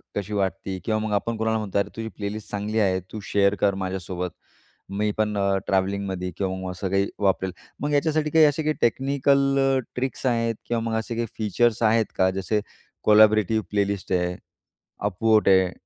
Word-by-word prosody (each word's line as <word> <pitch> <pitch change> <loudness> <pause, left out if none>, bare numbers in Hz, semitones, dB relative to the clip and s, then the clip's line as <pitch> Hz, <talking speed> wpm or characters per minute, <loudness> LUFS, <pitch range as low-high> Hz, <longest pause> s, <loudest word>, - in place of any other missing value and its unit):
कशी 105 +1 -3
वाटते?" 95 -1 -2
किंवा 110 -1 +1
मग 110 0 -3
आपण 115 +3 -1
कुणाला 110 0 0
म्हणतो, 105 -3 -3
"अरे, 100 - -1
तुझी 115 0 -4
प्लेलिस्ट 105 +1 -5
चांगली 105 +2 -1
आहे. 95 -3 +2
तू 110 - -5
शेअर 100 +1 +2
कर 100 -1 +3
माझ्यासोबत. 90 -1 -3 0.7
मी 105 0 +1
पण 105 -1 0
अ, 100 -1 +2
ट्रॅव्हलिंगमध्ये 95 -1 -1
किंवा 95 -1 -1
मग 95 -1 -4
असं 95 +1 -4
काही 100 +1 +1
वापरेन." 95 -2 +1 0.3
मग 145 0 -1
याच्यासाठी 155 +1 +1
काही 160 +1 +6
असे 150 +1 +1
काही 155 0 +1
टेक्निकल 140 +2 +2
अ, 135 0 +3 0.2
ट्रिक्स 130 +1 -3
आहेत 115 -2 +1
किंवा 120 -1 0
मग 110 - -1
असे 115 +1 -5
काही 115 0 -1
फीचर्स 115 +2 +1
आहेत 110 0 +4
का? 95 - +4
जसे 95 +3 -1 0.4
कोलॅबोरेटिव 110 0 +5
प्लेलिस्ट 100 -1 -1
आहे. 90 0 0 0.7
अप 100 0 -3
वोट 110 -1 +4
आहे. 95 -2 +5
105 Hz, 180 wpm, -24 LUFS, 95-115 Hz, 0.7 s, काही